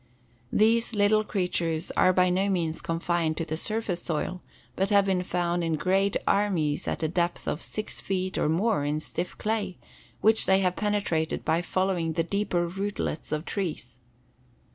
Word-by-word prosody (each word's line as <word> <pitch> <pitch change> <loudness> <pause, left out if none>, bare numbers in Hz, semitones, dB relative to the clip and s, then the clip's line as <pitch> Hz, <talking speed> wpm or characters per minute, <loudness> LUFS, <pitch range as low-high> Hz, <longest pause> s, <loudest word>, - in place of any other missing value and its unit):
These 230 +2 +3
little 210 +1 +4
creatures 175 -5 -1
are 185 - +4
by 180 0 +3
no 190 +2 +1
means 165 -4 -1
confined 165 -1 -1
to 165 - -2
the 155 0 -3
surface 205 0 -2
soil, 175 +3 -2 0.3
but 195 +1 0
have 200 -1 +5
been 190 -2 +1
found 175 -1 -1
in 165 -1 0
great 190 +4 +1
armies 175 -8 +1
at - - -2
a - - +2
depth 175 +1 -1
of 150 - -2
six 215 - -4
feet 185 -1 -2
or - - +1
more 180 0 +1
in 150 +1 0
stiff 175 +3 -5
clay, 210 -4 -2 0.4
which 220 +1 +5
they 190 - +5
have 180 -1 +1
penetrated 200 -7 -1
by 165 - +2
following 180 -3 0
the 165 +1 +1
deeper 180 -1 0
rootlets 195 -4 -3
of 155 +2 -2
trees. 150 - -4
180 Hz, 165 wpm, -27 LUFS, 165-200 Hz, 0.4 s, have